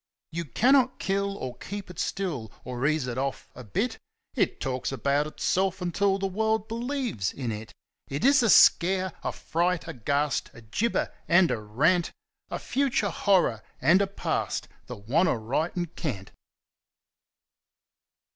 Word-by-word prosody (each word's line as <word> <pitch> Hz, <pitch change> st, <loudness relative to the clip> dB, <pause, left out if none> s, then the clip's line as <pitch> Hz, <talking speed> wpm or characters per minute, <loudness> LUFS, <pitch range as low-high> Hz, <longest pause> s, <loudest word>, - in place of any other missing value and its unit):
You 170 Hz, +1 st, -3 dB
cannot 255 Hz, -, +3 dB
kill 200 Hz, +1 st, -1 dB
or 130 Hz, -7 st, -6 dB
keep 200 Hz, -2 st, -6 dB
It 175 Hz, -, -11 dB
still, 150 Hz, -, -2 dB
or 125 Hz, +2 st, -2 dB
ease 155 Hz, -3 st, +1 dB
It 125 Hz, 0 st, -3 dB
off 135 Hz, 0 st, -3 dB
a 125 Hz, -, -10 dB
bit; 100 Hz, -4 st, -2 dB, 0.3 s
It -, -, 0 dB
talks 130 Hz, 0 st, -2 dB
about 140 Hz, +2 st, +1 dB
Itself 190 Hz, +4 st, 0 dB
until 195 Hz, +2 st, +1 dB
the 195 Hz, -, -2 dB
world 220 Hz, +2 st, 0 dB
believes 235 Hz, -, -2 dB
in 125 Hz, -4 st, -4 dB
It. 110 Hz, +1 st, -7 dB, 0.4 s
It 140 Hz, -, -2 dB
is 275 Hz, 0 st, +6 dB
a 230 Hz, -, +2 dB
Scare, 185 Hz, 0 st, +5 dB
a -, -, -1 dB
Fright, 170 Hz, +1 st, -1 dB
a 165 Hz, -, -5 dB
Ghast, 140 Hz, +3 st, 0 dB
a 115 Hz, -, -11 dB
Gibber, 215 Hz, -, -1 dB
and 175 Hz, 0 st, +5 dB
a -, -, -1 dB
Rant, 150 Hz, -, +1 dB, 0.4 s
A -, -, -3 dB
future 260 Hz, -7 st, 0 dB
Horror 180 Hz, -, +2 dB, 0.2 s
and 185 Hz, +4 st, +5 dB
a 200 Hz, -, +2 dB
Past, 200 Hz, -, -2 dB, 0.2 s
the -, -, -7 dB
Wantaritencant! 145 Hz, -, -1 dB
170 Hz, 145 wpm, -27 LUFS, 130-200 Hz, 0.4 s, is